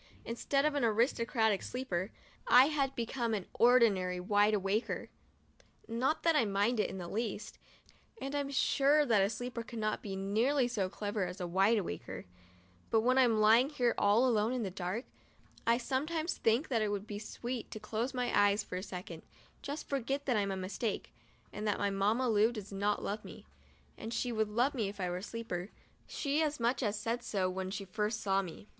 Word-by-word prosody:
Instead 275 +4 0
of 305 - +2
an 285 -3 0
"aris 230 +3 +3
tocratic" 220 -4 +1
sleeper, 200 -7 -3 0.4
I 255 +4 +7
had 275 -2 0
become 235 -1 -1
an 195 - -4
ordinary 210 -7 +4
"wide 205 +3 +3
awaker" 200 +3 -1 0.4
— - - -30 0.2
not 250 +7 0
that 330 -1 +4
I 295 - +4
mind 205 +3 +1
it - - +1
in 190 - -6
the 175 -2 -6
least 220 +1 -4 0.3
— - - -30
and 275 +1 -5
I'm 285 -1 -1
sure 280 +2 +3
that 220 -6 +4
a 195 - +3
"sleeper" 245 +2 -4
cannot 220 -2 -3
be 195 -2 -5
nearly 230 +8 +1
so 205 -6 -1
clever 205 -1 -2
as 180 +2 -7
a 180 - -2
"wide 195 +6 +3
awaker; 195 - -5 0.3
' 90 -1 -31
but 225 - +3
when 255 +3 +3
I'm 235 -4 +4
lying 225 +5 +5
here 245 -6 +1
all 210 +5 +4
alone 225 0 +2
in 250 -2 -1
the 195 - -3
dark, 185 +6 -4 0.6
I 230 0 +5
sometimes 310 +7 -1
think 230 +6 +2
that 235 -4 +1
it 215 - +1
would 205 0 -3
be 205 -1 -6
sweet 240 +2 -5
to 215 - -7
close 225 +4 -2
my 250 -2 -1
eyes 205 0 +4
for 180 - -5
a - - -3
second, 180 -4 -7 0.4
just 285 +2 -5
to - - -28
forget 275 +1 -2
that 250 - +1
I 210 - +3
am 200 - -1
a 190 - -3
mistake, 195 +3 -3 0.4
and 210 +1 -4
that 205 - +1
my 200 0 0
Mamma 210 +6 +1
Lu 220 0 +4
does 210 -4 -8
not 205 +1 0
love 210 +2 -3
me. - - -11 0.5
And 225 - -6
she 245 +1 -1
would 220 -2 0
love 245 +6 +1
me 220 -7 -1
if 200 0 -10
I 180 -2 -1
were 175 - -2
a - - -6
"sleeper;' 210 -4 -5 0.4
she 290 +1 -1
as 300 -2 0
much 240 +3 +1
as 210 -3 0
said 230 +3 -2
so 190 -5 -1
when 185 0 -4
she 195 +1 -5
first 210 +3 -2
saw 195 -1 +1
me. 185 +2 -9
220 Hz, 215 wpm, -33 LUFS, 200-250 Hz, 0.6 s, I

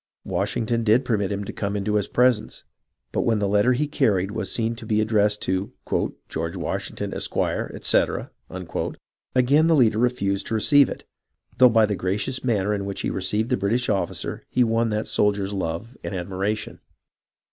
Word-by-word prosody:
Washington 115 +1 -1
did 115 +4 +3
permit 105 -4 0
him 100 0 -2
to - - -7
come 100 -1 -3
into 105 +1 -1
his 105 -2 +1
presence, 125 -3 +1 0.5
but - - 0
when 115 -2 +2
the 100 -1 0
letter 105 +5 +3
he 140 +5 0
carried 105 -10 +1
was - - -3
seen 115 0 0
to 115 - -8
be 110 -1 +2
addressed 105 -1 +2
to 95 +2 -1 0.3
" - - -6
George 80 +1 -4
Washing - - -4
ton, - - -4
Esq., - - -3
etc.," - - 0 1.0
again 140 +5 +4
the 165 - +4
leader 110 -6 +4
refused 100 -5 0
to 115 - -1
receive 140 +5 +5
it, - - -7 0.6
though 125 -1 +8
by 115 -1 +4
the 105 -1 -1
gracious 100 +8 -2
manner 105 -5 +1
in 100 -1 -2
which 100 - -4
he - - -1
received 110 +4 -1
the 125 - +3
British 115 +6 0
officer 100 -2 -2
he 125 - +3
won 115 0 +1
that 105 0 -1
soldier's 100 -1 +1
love 95 +6 -4
and 100 - -4
admiration. 95 +4 -3
105 Hz, 180 wpm, -24 LUFS, 100-120 Hz, 1.0 s, though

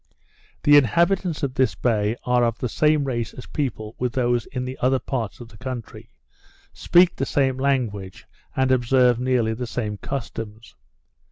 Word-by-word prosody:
The 145 0 +7
inhabitants 170 - +2
of 135 -2 -1
this 130 -1 +1
bay 110 -2 0
are 125 -1 +3
of 115 -1 0
the 125 - -2
same 150 +4 +2
race 120 -4 -3
of 125 - -12
people 115 -7 -3
with 125 -2 -1
those 120 -2 0
in 125 -1 -4
the 130 +1 -5
other 130 +1 +3
parts 125 -5 -4
of 120 -2 -10
this 110 - -16
country, 125 -3 -7 0.6
speak 175 0 +4
the - - -3
same 135 -2 +1
language, 115 -9 -2 0.3
and 130 0 +2
observe 125 -1 +3
nearly 125 -3 +1
the 120 +2 -5
same 105 -3 -3
customs. 115 -4 -6
125 Hz, 165 wpm, -23 LUFS, 115-135 Hz, 0.6 s, The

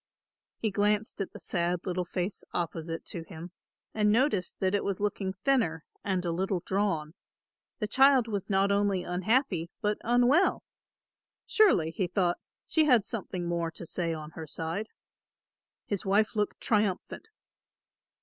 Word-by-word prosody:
He 220 - -1
glanced 210 +2 +1
at 195 - -3
the - - -9
sad 175 0 -1
little 180 -1 -1
face 180 +2 -3
opposite 165 -1 -3
to 170 - -5
him 165 +1 -9 0.4
and 210 -1 +3
noticed 225 -5 +1
that 190 0 +1
it 205 - +1
was 200 -2 -2
looking 200 -2 -1
thinner 200 - +2 0.2
and 190 -3 -1
a 170 - 0
little 185 +1 -1
drawn; 190 -6 0 0.6
the 215 - -2
child 265 +1 +5
was 205 -3 -3
not 195 0 +3
only 200 -2 +2
unhappy, 185 - 0
but 210 0 0
unwell. 245 - +3 0.8
Surely, 430 - +4
he 180 +2 -1
thought, 175 -1 0 0.3
she 315 -1 +3
has 245 -8 +4
something 190 -5 -4
more 170 -1 -1
to 170 - -7
say 170 0 -2
on 155 -1 -6
her 160 -1 -8
side. 165 +8 -3 1.0
His 200 -3 -2
wife 210 +3 +2
looked 210 -1 -1
triumphant. 210 - -1
195 Hz, 150 wpm, -29 LUFS, 175-215 Hz, 1.0 s, child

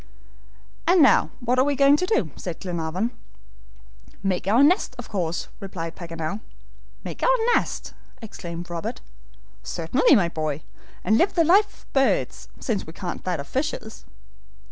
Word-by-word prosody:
"And 360 +1 +5
now 250 -7 +5
what 245 +1 +1
are - - +6
we 285 +1 +1
going 275 +1 +6
to 365 - -1
do?" 185 - +1
said 175 -3 -6
Glenarvan. 180 +5 -2 1.1
"Make 190 -1 -1
our 230 +7 +5
nest, 305 -4 +3
of 245 - -8
course!" 175 -5 -2
replied 170 -5 -6
Paganel 165 +2 -4 0.6
"Make - - -7
our - - +3 0.2
nest!" - - -1 0.3
exclaimed 175 -6 -7
Robert. 170 -1 -5 0.6
"Certainly, 170 - +3
my 190 -7 +3
boy, 155 -3 -3 0.4
and 220 - +3
live 370 - +2
the 335 - +5
life 405 +5 +3
of - - -29
birds, 270 -1 +1
since 215 -9 -2
we 160 - -9
can't 180 0 -5
that 180 -4 -1
of 140 - -6
fishes." 260 -5 -3
200 Hz, 150 wpm, -24 LUFS, 170-270 Hz, 1.1 s, are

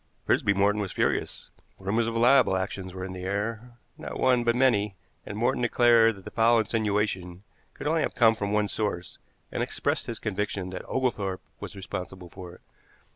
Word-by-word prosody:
Frisby 100 - +2
Morton 100 +2 +2
was 100 - -4
furious. - - -1 0.3
Rumors 110 +4 0
of 115 0 -2
libel 120 -4 +5
actions 95 0 -4
were 95 0 -6
in 95 - -6
the 90 - -7
air, 110 +5 -3 0.2
not - - -6
one 125 -2 +3
but 120 0 +2
many, 105 -6 +2 0.3
and 105 - -5
Morton 125 +3 +1
declared 120 -2 +5
that 95 - -15
the - - -7
foul 115 +1 +4
insinuation 105 -4 -1 0.3
could - - -8
only 160 +2 +2
have - - -2
come 115 -3 +5
from 100 -2 -3
one 105 0 +2
source, 100 -4 -3 0.3
and - - -2
expressed - - -1
his 115 - -3
conviction 100 -3 -3
that 95 - -5
Oglethorpe 100 -8 -1 0.2
was - - -8
responsible 90 -1 -7
for 90 -2 -10
it. - - -20
105 Hz, 180 wpm, -27 LUFS, 95-115 Hz, 0.3 s, libel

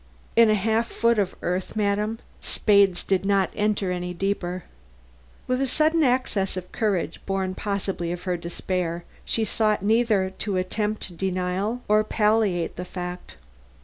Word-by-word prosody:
"In 230 -1 +7
a 215 - +5
half 220 +3 +1
foot 230 -1 +2
of 190 -2 0
earth, 180 +3 -2
madam? 210 +1 0 0.2
The - - -10
spades 200 -4 +3
did 190 -1 +1
not 195 -1 +2
enter 210 -3 0
any 180 0 -3
deeper." 185 -1 -2 0.8
With 255 +1 0
a 270 - +1
sudden 315 +4 +2
access 245 -8 +1
of 180 0 -6
courage, 195 -7 -1
born 190 -1 -1
possibly 195 -3 -2
of 175 0 -5
her 180 -2 0
despair, 170 0 -3 0.2
she 225 - +1
sought 215 -2 +1
neither 215 -3 +2
to 200 -3 -1
attempt 210 0 -2
denial 190 +6 -1
nor 215 0 +4
palliate 210 -5 +1
the 180 - -3
fact. 180 0 -6
195 Hz, 150 wpm, -25 LUFS, 180-215 Hz, 0.8 s, In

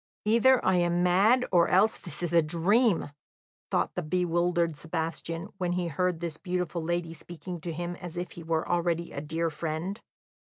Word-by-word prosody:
"Either 235 +4 +5
I 190 -1 +4
am 175 0 +2
mad 205 +8 +4
or 175 -2 +5
else 205 +5 +3
this 175 -1 -8
is 170 -1 -2
a 170 - +6
dream," 175 - +2 0.6
thought - - 0
the 180 - -2
bewildered 175 0 +1
Sebastian, 165 +3 -4
when 175 -1 0
he 175 -1 -1
heard 175 +2 -1
this 165 -3 -4
beautiful 180 -1 -2
lady 170 0 -2
speaking 175 +1 -8
to 170 - -4
him 175 +2 -4
as 175 -1 -8
if 175 0 -4
he 170 - -9
were 160 -1 -1
already 170 -1 0
a 140 - -5
dear 165 +2 -2
friend. 165 +6 -4
175 Hz, 175 wpm, -28 LUFS, 165-180 Hz, 0.6 s, a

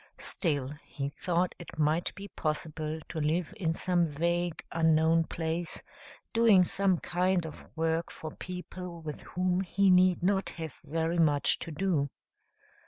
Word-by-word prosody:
Still, 145 -7 -1
he 140 -2 -4
thought 175 +4 0
it 170 -2 -10
might 155 +2 +1
be 200 +2 -7
possible 155 0 -2
to 160 - -4
live 160 +4 0
in 165 -6 -1
some 175 -1 +2
vague, 170 +3 -1
unknown 160 0 +4
place, 165 +1 -3 0.5
doing 225 -5 +6
some 190 0 +2
kind 180 +1 +1
of 155 - -8
work 165 +1 0
for 155 - -7
people 180 -1 -7
with 150 -2 -6
whom 180 0 0
he 195 +1 +3
need 180 -1 +5
not 190 +1 +2
have 160 -4 -5
very 165 +2 -1
much 145 -3 +4
to - - -6
do. 155 -3 0
170 Hz, 145 wpm, -30 LUFS, 160-180 Hz, 0.5 s, doing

